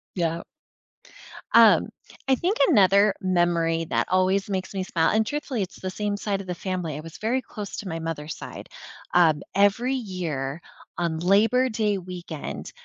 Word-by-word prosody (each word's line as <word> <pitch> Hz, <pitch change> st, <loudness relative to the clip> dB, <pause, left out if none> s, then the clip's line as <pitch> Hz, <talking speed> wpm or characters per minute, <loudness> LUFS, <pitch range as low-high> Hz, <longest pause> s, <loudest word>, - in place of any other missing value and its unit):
Yup. 170 Hz, -2 st, -1 dB, 1.1 s
Um, -, -, +6 dB, 0.4 s
I 265 Hz, -, +4 dB
think 360 Hz, -, -1 dB
another 200 Hz, +1 st, +5 dB
memory 170 Hz, -3 st, +1 dB
that -, -, 0 dB
always 190 Hz, +2 st, +2 dB
makes 190 Hz, 0 st, -3 dB
me 190 Hz, -, -2 dB
smil 165 Hz, -3 st, +1 dB
and 220 Hz, 0 st, +3 dB
truthfully, 270 Hz, -3 st, -3 dB
it's 185 Hz, -, -5 dB
the 185 Hz, -, -4 dB
same 205 Hz, +2 st, -2 dB
side 200 Hz, -1 st, -2 dB
of 190 Hz, -, -12 dB
the 180 Hz, -, -3 dB
family, 180 Hz, -5 st, -3 dB
I -, -, -6 dB
was 165 Hz, +1 st, -10 dB
very 240 Hz, +4 st, 0 dB
close 210 Hz, -4 st, -8 dB
to 205 Hz, -, -6 dB
my 165 Hz, -1 st, -4 dB
mother's 160 Hz, -2 st, -5 dB
side, -, -, -9 dB, 0.5 s
um, 160 Hz, -4 st, +4 dB
every 210 Hz, +6 st, +3 dB
year 170 Hz, -, -4 dB, 0.4 s
on 170 Hz, -2 st, -1 dB
Labor 220 Hz, +8 st, +3 dB
Day 215 Hz, -3 st, 0 dB
weekend 175 Hz, -4 st, -7 dB
185 Hz, 165 wpm, -25 LUFS, 170-210 Hz, 1.1 s, Um